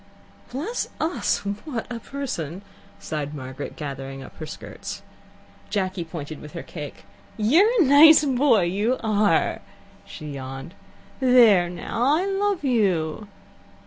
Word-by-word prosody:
"Bless 325 Hz, -, -3 dB
us, 320 Hz, -, 0 dB, 0.2 s
what 255 Hz, -8 st, -4 dB
a 235 Hz, -, -4 dB
person!" 200 Hz, -, -5 dB, 0.3 s
sighed 150 Hz, -6 st, -4 dB
Margaret, 130 Hz, -1 st, -7 dB
gathering 135 Hz, -2 st, -6 dB
up -, -, -13 dB
her 155 Hz, -, -6 dB
skirts. -, -, -8 dB, 0.7 s
Jacky 190 Hz, -3 st, -1 dB
pointed 155 Hz, -2 st, -7 dB
with 150 Hz, -, -11 dB
her 170 Hz, -, -6 dB
cake. 150 Hz, -4 st, -9 dB, 0.3 s
"You're 310 Hz, -, +5 dB
a 355 Hz, -, +6 dB
nice 300 Hz, +3 st, +8 dB
boy, 260 Hz, -6 st, +3 dB
you 205 Hz, +8 st, 0 dB
are." 210 Hz, -5 st, +2 dB, 0.5 s
She 150 Hz, -1 st, -8 dB
yawned. 135 Hz, +3 st, -7 dB, 0.5 s
"There 235 Hz, -9 st, +6 dB
now, 235 Hz, +10 st, 0 dB
I 365 Hz, -, 0 dB
love 395 Hz, -2 st, 0 dB
you." 200 Hz, -, +1 dB
205 Hz, 125 wpm, -24 LUFS, -, 0.7 s, nice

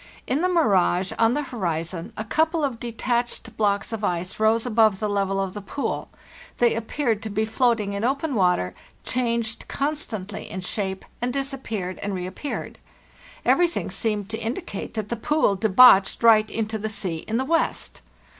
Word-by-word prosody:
In 270 Hz, +5 st, 0 dB
the 365 Hz, -, +2 dB
mirage 195 Hz, -, +3 dB
on 230 Hz, +2 st, +4 dB
the 295 Hz, -, 0 dB
horizon, 175 Hz, -, -3 dB
a 215 Hz, -, -2 dB
couple 315 Hz, +7 st, +1 dB
of 260 Hz, -5 st, -1 dB
detached 235 Hz, -1 st, -2 dB
blocks 205 Hz, 0 st, 0 dB
of 220 Hz, -1 st, -4 dB
ice 180 Hz, 0 st, -2 dB
rose 220 Hz, +2 st, +3 dB
above 220 Hz, -4 st, +4 dB
the 215 Hz, -, -1 dB
level 195 Hz, -1 st, 0 dB
of 195 Hz, -1 st, -2 dB
the 205 Hz, -, -6 dB
pool; 275 Hz, +8 st, -3 dB, 0.5 s
they 240 Hz, -1 st, +4 dB
appeared 230 Hz, 0 st, -1 dB
to 220 Hz, -, -4 dB
be 215 Hz, +1 st, 0 dB
floating 220 Hz, -2 st, +1 dB
in 200 Hz, +1 st, -3 dB
open 275 Hz, +4 st, 0 dB
water, 180 Hz, -, +2 dB, 0.3 s
changed 235 Hz, -3 st, -1 dB
constantly 255 Hz, -9 st, -3 dB
in 190 Hz, -, -5 dB
shape, 190 Hz, 0 st, -3 dB, 0.2 s
and 245 Hz, +1 st, 0 dB
disappeared 250 Hz, -9 st, -3 dB
and 205 Hz, -1 st, -2 dB
reappeared. 185 Hz, +10 st, -5 dB, 0.7 s
Everything 345 Hz, -, +2 dB
seemed 205 Hz, 0 st, -1 dB
to 220 Hz, 0 st, -3 dB
indicate 230 Hz, -, -5 dB
that 215 Hz, -2 st, -3 dB
the 235 Hz, -, -1 dB
pool 235 Hz, -2 st, +2 dB
debouched 200 Hz, +1 st, +6 dB
right 215 Hz, -2 st, +6 dB
into 220 Hz, -1 st, -2 dB
the 220 Hz, +1 st, -3 dB
sea 200 Hz, -5 st, -1 dB
in 225 Hz, -, 0 dB
the 260 Hz, -, 0 dB
west. 330 Hz, +3 st, 0 dB
220 Hz, 165 wpm, -24 LUFS, 195-250 Hz, 0.7 s, debouched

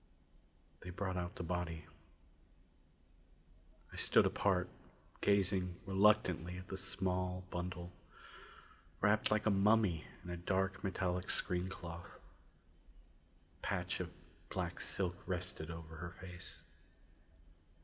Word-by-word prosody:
They 90 Hz, -, -8 dB
brought 95 Hz, +1 st, -2 dB
out 90 Hz, -1 st, -2 dB
the -, -, -2 dB
body. 85 Hz, -2 st, -2 dB, 2.1 s
I -, -, -8 dB
stood -, -, +6 dB
apart, 90 Hz, -3 st, +2 dB, 0.5 s
gazing 95 Hz, -3 st, +3 dB
reluctantly 95 Hz, -3 st, +4 dB
at 90 Hz, 0 st, -9 dB
the -, -, -2 dB
small 90 Hz, -1 st, -1 dB
bundle, 90 Hz, 0 st, -3 dB, 1.1 s
wrapped 105 Hz, +1 st, +5 dB
like 105 Hz, 0 st, +2 dB
a 110 Hz, -, +5 dB
mummy 100 Hz, -4 st, +4 dB, 0.2 s
in 90 Hz, -, -6 dB
a 90 Hz, -, -3 dB
dark 95 Hz, +2 st, 0 dB
metallic 90 Hz, -2 st, 0 dB
screen 90 Hz, +1 st, 0 dB
cloth. 85 Hz, -2 st, -7 dB, 1.4 s
A -, -, -31 dB
patch -, -, -1 dB
of -, -, -2 dB, 0.4 s
black -, -, -2 dB
silk 90 Hz, -2 st, -1 dB
rested 90 Hz, -3 st, -2 dB
over 80 Hz, -1 st, -7 dB
her 85 Hz, +2 st, -4 dB
face. 90 Hz, -1 st, -7 dB
90 Hz, 110 wpm, -37 LUFS, 90-95 Hz, 2.1 s, stood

